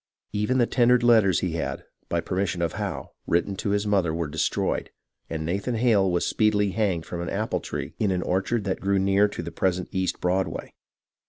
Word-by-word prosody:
Even 105 +5 +1
the 120 - +4
tender 125 +1 +4
letters 115 -7 +4
he 90 - -1
had, 80 - -3 0.3
by - - 0
permission 90 -2 -1
of 85 - -1
Howe, - - -4 0.2
written 85 +3 +1 0.2
his 100 +1 +1
mother 95 -5 +2
were 85 0 -1
destroyed, 75 +1 -1 0.4
and 80 -1 -3
Nathan 100 +8 -1
Hale 110 -5 +3
was 85 - +1
speedily 105 -2 +2
hanged 95 -6 0
from 85 - -5
an 85 - -3
apple 110 +3 -1
tree - - -5
in 105 - +2
an 90 -1 0
orchard 100 +5 0
that 95 -1 -2
grew 100 0 +2
near 100 +2 +4
to 100 - -6
the 85 - -6
present 90 -1 -1
East 95 -1 -1
Broadway. 95 +2 -1
95 Hz, 190 wpm, -25 LUFS, 90-105 Hz, 0.4 s, the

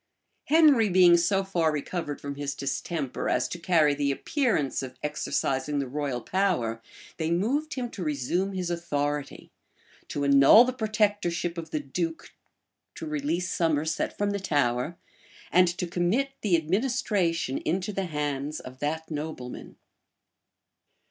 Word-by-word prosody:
Henry 290 -8 +5
being 180 -1 +6
so 185 +3 +2
far 170 -5 +1
recovered 150 0 -4
from 140 0 -5
his 140 0 -4
distemper, 140 0 -3
as 125 - +1
to 175 - -6
carry 160 -4 +3
the 145 0 0
appearance 210 - 0
of 130 -1 -8
exercising 145 -1 -1
the 140 -1 -1
royal 140 -2 -3
power, 165 - 0 0.4
they 160 -1 -1
moved 250 - 0
him 250 -2 -2
to 185 - -6
resume 160 +6 -1
his 180 -2 -2
authority, 145 -4 -3 0.6
to 145 - -3
annul 140 - +8
the 255 - -2
protectorship 205 -7 0
of 165 -2 -6
the 155 - -2
duke 165 +4 -4 0.6
to - - -6
release 155 +4 -2
Somerset 160 -1 0
from 205 0 0
the 200 - -2
Tower,[*] 145 -3 0 0.5
and 180 +1 +5
to 180 - -1
commit 180 +11 0
the 195 -5 +3
administration 185 - 0
into 185 +5 -2
the 195 0 -2
hands 150 -2 -3
of 130 0 -11
that 160 +2 -3
nobleman. 150 -5 -6
165 Hz, 140 wpm, -27 LUFS, 145-190 Hz, 0.6 s, annul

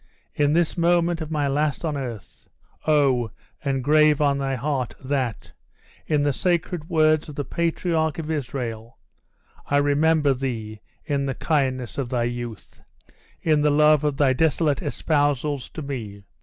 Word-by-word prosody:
in 145 0 +2
this 170 +1 +1
moment 170 0 +2
of 155 - -5
my 150 -3 0
last 145 +3 0
on 155 -2 -1
earth, 120 -8 -7 0.4
O! 135 -6 +3 0.3
engrave 145 +2 +3
on 140 -2 +2
thy 135 -1 -1
heart, 130 -1 -2
that 130 -4 -3 0.6
in 150 -2 +2
the 145 -1 +1
sacred 175 0 -1
words 155 -2 +3
of 150 - -9
the 145 - -3
patriarch 165 -2 -1
of 160 -1 -4
Israel 120 -6 -4 0.7
I 145 - +2
remember 145 +1 +3
thee, 115 -5 -5 0.2
in 140 -2 -1
the 135 - -2
kindness 130 -5 -1
of 130 -3 -2
thy 125 -2 0
youth! 120 -2 -6 0.6
in 155 -2 +3
the 150 - +3
love 150 0 +4
of 145 -2 0
thy 140 -3 +3
desolate 155 0 +1
espousals 145 -2 0
to 155 - -7
me! 110 -8 -6
145 Hz, 150 wpm, -24 LUFS, 130-155 Hz, 0.7 s, love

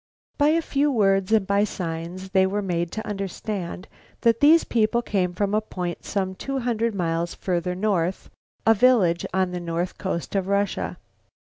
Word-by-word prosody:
By 290 - +5
a 330 +1 +2
few 290 0 +1
words 195 -4 +2
and 220 -3 +4
by 200 +1 +2
signs 180 0 -5
they 190 -1 +4
were 205 +2 -2
made 170 -2 -1
to 220 - -4
understand 195 -2 -4 0.3
that 230 -1 +3
these 315 +3 +6
people 235 +1 +1
came 185 -5 0
from 200 +3 -1
a 215 - +3
point 180 -5 -5
some 190 -2 -1
two 275 +8 -4
hundred 230 -3 -1
miles 170 -2 -1
farther 180 -1 -2
north, 185 -3 -1 0.3
a 225 - +7
village 205 -7 +3
on 185 -1 +1
the 180 - -3
north 170 +1 -3
coast 185 -3 -3
of 195 -2 0
Russia. 200 0 -1
195 Hz, 170 wpm, -24 LUFS, 180-220 Hz, 0.3 s, a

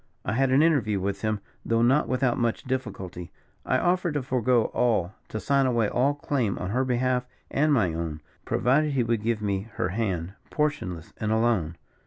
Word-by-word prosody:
I - - -1
had 135 +3 +2
an 135 +4 +5
interview 120 -11 +2
with 100 +1 -2
him, 110 -2 -1 0.2
though 115 0 +2
not 135 +5 +3
without 130 -1 +1
much 120 -1 0
difficulty; 95 -10 -4 0.4
I - - +3
offered 175 -3 +1
to 145 - 0
forego 125 -2 +1
all 110 -7 +1
to 110 - -4
sign 140 +2 +2
away 115 -4 +2
all 140 +4 +2
claim 130 -8 -1
on 90 - -4
her 130 +4 +1
behalf 125 0 0 0.2
and 150 +2 +2
my 105 - +3
own, 80 -2 -4 0.2
provided 145 +4 +2
he 130 -3 +2
would 115 -2 0
give 110 -1 -1
me 100 +1 -2
her 90 - -1
hand, 95 -4 -2 0.2
portionless 90 - -2
and 110 0 -2
alone. 110 -8 +1
115 Hz, 185 wpm, -26 LUFS, 100-130 Hz, 0.4 s, an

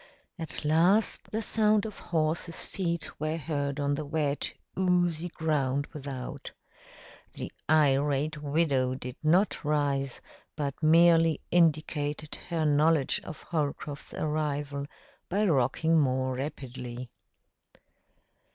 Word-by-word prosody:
At 160 -2 -6
last 175 +8 +3
the 220 +1 -2
sound 215 -1 +3
of 215 - -7
horses' 165 0 -1
feet 170 -4 -3
were 155 +2 -1
heard 145 -2 -2
on 145 0 +1
the 155 +2 -2
wet, 145 -1 -1 0.2
oozy 175 -2 +1
ground 145 -4 0
without. 135 -4 -6 0.8
The - - -6 0.2
irate 145 0 +2
widow 140 -4 +1
did 125 -1 -7
not 175 +6 +2
rise, 140 -3 0 0.4
but 145 -3 -2
merely 165 0 +5
indicated 155 -2 +1 0.2
her 165 -2 0
knowledge 150 -1 +3
of 160 - -9
Holcroft's 145 -2 -3
arrival 145 -2 -2 0.4
by 205 +4 +1
rocking 160 +1 +3
more 130 -2 +1
rapidly. 125 -3 -6
150 Hz, 105 wpm, -29 LUFS, 140-165 Hz, 0.8 s, merely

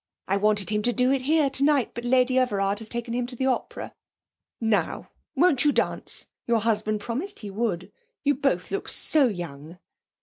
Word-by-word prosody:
I 195 - +1
wanted 205 0 +1
him 210 0 +1
to 245 +3 +1
do 250 +2 +2
it 270 -1 +1
here 300 +2 +3
tonight, 280 -2 +2
but 235 - -6
Lady 255 +1 +3
Everard 200 -5 0
has 220 -1 -9
taken 235 -1 -4
him 245 0 -1
to 250 - -6
the 260 - -1
opera. 260 -1 -2 0.7
Now, 220 -3 0 0.2
won't 285 -4 +4
you 295 - +5
dance? - - -1 0.2
Your 230 -2 +2
husband 215 -1 0
promised 280 - -4
he 205 -2 -6
would. 195 -3 -2 0.3
You 285 0 +3
both 250 -10 -1
look 395 - -3
so 295 -4 +3
young!' 170 -5 -6
235 Hz, 180 wpm, -25 LUFS, 205-265 Hz, 0.7 s, you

